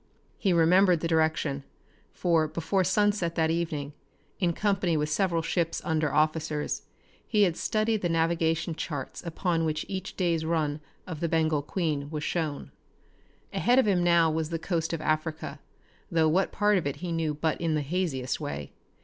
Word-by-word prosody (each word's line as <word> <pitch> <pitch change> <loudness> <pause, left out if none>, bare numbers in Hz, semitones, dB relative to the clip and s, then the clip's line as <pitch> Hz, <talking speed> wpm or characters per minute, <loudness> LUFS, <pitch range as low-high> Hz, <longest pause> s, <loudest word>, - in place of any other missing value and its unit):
He 195 - +2
remembered 175 +1 +4
the 165 - 0
direction, 160 -3 +1 0.5
for 165 -3 +2
before 170 +5 0
sunset 190 -3 +1
that 160 -1 +2
evening, 155 -4 -2 0.5
in 180 -4 +2
company 185 -3 +1
with 150 0 0
several 170 0 +1
ship's 165 0 0
under 155 -2 +1
officers, 155 0 0 0.5
he 210 -2 +3
had 175 -4 +2
studied 215 +2 0
the 175 - 0
navigation 165 0 +1
charts 145 -4 -5
upon 170 0 -1
which 155 -1 -1
each 190 -1 -5
day's 170 -4 +1
run 155 -2 -1 0.2
of 165 -4 -6
the 170 - -1
Bengal 160 -2 +2
Queen 150 -2 -2
was 150 -1 -4
shown. 155 -4 -2 0.8
Ahead 245 +1 +3
of 265 - +5
him 185 -3 +3
now 170 -2 +4
was 160 0 -1
the 165 - -2
coast 165 -1 -2
of 165 -2 -3
Africa, 155 -1 -2 0.5
though 165 -2 +3
what 185 +5 +2
part 205 -1 +3
of 155 - -3
it 140 - -2
he 170 +4 -5
knew 160 -2 -1
but 155 +2 -1
in 165 -2 +1
the 150 - +1
haziest 145 -5 -2
way. 70 -1 -5
165 Hz, 170 wpm, -28 LUFS, 155-175 Hz, 0.8 s, of